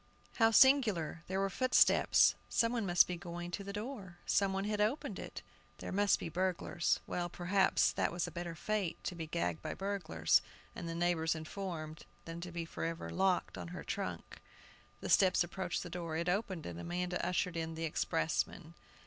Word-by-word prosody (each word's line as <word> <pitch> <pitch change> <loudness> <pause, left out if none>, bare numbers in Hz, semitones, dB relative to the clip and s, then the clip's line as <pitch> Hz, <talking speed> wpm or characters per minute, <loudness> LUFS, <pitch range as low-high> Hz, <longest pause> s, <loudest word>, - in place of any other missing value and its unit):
How 225 -1 +6
singular! 220 - +4
there 190 +1 -1
were 195 0 0
footsteps. 255 +5 +5 0.2
Some 230 0 +2
one 230 -5 -1
was 175 0 +7
going 175 0 -6
to 200 - -4
the 200 - -6
door; 205 -4 -6
some 200 -1 +2
one 195 0 -1
had 210 0 -1
opened 225 +8 -1
it. - - -7 0.3
"They - - -6
must 200 +1 +3
be - - -5
burglars." 175 0 0
Well, 175 -1 -2
perhaps 185 +3 +2
that - - 0
was 175 +1 -1
a - - -6
better 175 -1 -5
fate 200 -1 -2
to - - -3
be 165 -2 -6
gagged 90 - -2
by - - -4
burglars, 195 -4 +1 0.3
and 170 - -5
the 165 - -4
neighbors 170 -1 +1
informed 160 -1 -6 0.2
than 165 +1 -6
to 180 0 -6
be 170 -1 -4
forever 165 0 -4
locked 190 -1 +1
on - - -6
her 180 +1 -7
trunk. - - -5 0.6
The - - -4
steps 185 -2 +5
approached 175 0 -3
the 175 - -7
door. 170 -2 -3
It 170 +1 -2
opened, 190 -3 -1
and 85 -1 -6
Amanda 180 - -2
ushered 180 -1 0
in 165 0 -3
the 165 +1 -2
expressman. 165 +1 -1
175 Hz, 180 wpm, -34 LUFS, 165-195 Hz, 0.6 s, was